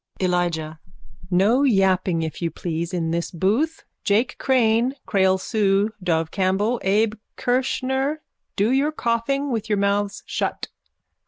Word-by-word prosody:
_ 190 - +1
ELIJAH: 170 -3 -1 0.5
No 200 +8 +3
yapping, 190 -8 +2
if 160 +2 -5
you 170 - 0
please, 165 0 -4
in 165 -3 -1
this 170 0 -1
booth. 220 - 0 0.2
Jake 225 +5 +1
Crane, 245 0 +2
Creole 190 -2 +3
Sue, 205 +1 +1
Dove 165 -3 0
Campbell, 200 +5 0
Abe 210 +3 +2 0.2
Kirschner, 265 +3 -1 0.3
do 210 +4 +2
your 275 +3 +2
coughing 275 +2 -1
with 225 -2 -3
your 210 - +2
mouths 200 0 0
shut. - - -3
205 Hz, 135 wpm, -23 LUFS, 180-245 Hz, 0.5 s, No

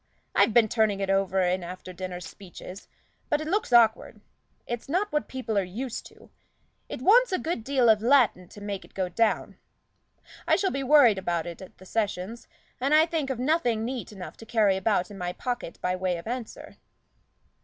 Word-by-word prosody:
I've 205 +3 +4
been 225 0 +5
turning 215 -3 +1
it 195 -1 0
over 195 -1 +1
in 180 0 0
after 185 +1 -8
dinner 180 0 -6
speeches, 185 +1 -11 0.4
but 295 - +2
it 310 - -5
looks 390 -3 -1
awkward 230 -2 +4 0.5
it's 240 +3 -5
not 385 +7 0
what 300 - -1
people 235 -5 -2
are - - 0 0.2
used 250 -4 -6
to - - -19 0.6
it - - -6
wants 485 +4 +5
a 370 - +1
good 320 -10 -3
deal 265 -1 +2
of 215 -2 +5
Latin 235 -7 +3
to 205 - -13
make 205 -1 -5
it - - -20
go 185 -2 -1
down. 225 +4 0 0.9
I - - +5
shall 385 - 0
be 275 - -2
worried 260 -7 +5
about 170 -3 -2
it 170 +1 -8
at 190 - -12
the 185 - -15
sessions, 210 +1 -3 0.3
and 275 +4 +2
I 310 - +7
can - - -17
think 315 -5 -2
of 265 - -2
nothing 245 -5 +1
neat 250 -2 -5
enough 190 -3 -9
to 225 - -12
carry 210 -4 +3
about 190 0 0
in 200 - -9
my 180 0 -3
pocket 240 -8 -4
by 180 0 0
way 185 -1 -1
of 170 - -9
answer." 240 0 -6
220 Hz, 200 wpm, -26 LUFS, 190-260 Hz, 0.9 s, I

